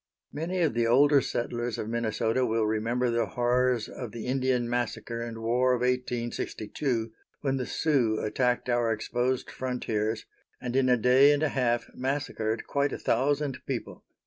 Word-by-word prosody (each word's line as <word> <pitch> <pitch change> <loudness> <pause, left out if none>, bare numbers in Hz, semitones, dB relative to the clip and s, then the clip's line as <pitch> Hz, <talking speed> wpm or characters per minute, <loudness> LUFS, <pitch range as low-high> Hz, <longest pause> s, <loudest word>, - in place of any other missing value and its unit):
Many 175 +4 -2
of 155 - +2
the 115 0 +1
older 140 +4 +5
settlers 120 -1 -2
of 110 - -4
Minnesota 115 +1 0
will 115 -2 +1
remember 115 +3 0
the 115 -1 +1
horrors 125 +1 +1
of 120 -4 -7
the 115 -2 -6
Indian 130 -2 +1
massacre 120 -1 -2
and 115 -1 -5
war 125 +3 +3
of 120 - -4
1862, 120 -1 -2 0.3
when 135 -2 0
the 125 - -3
Sioux 130 -9 +1
attacked 125 +4 0
our 120 -2 +2
exposed 120 +4 -1
frontiers, 110 -4 -2 0.3
and 125 0 -4
in 130 -1 +3
a 125 - +5
day 130 +5 +6
and 145 +1 +1
a 155 - +2
half 120 -3 +1
massacred 130 -4 -2
quite 140 0 0
a - - -3
thousand 140 +2 0
people. 130 -4 -5
125 Hz, 160 wpm, -28 LUFS, 115-130 Hz, 0.3 s, day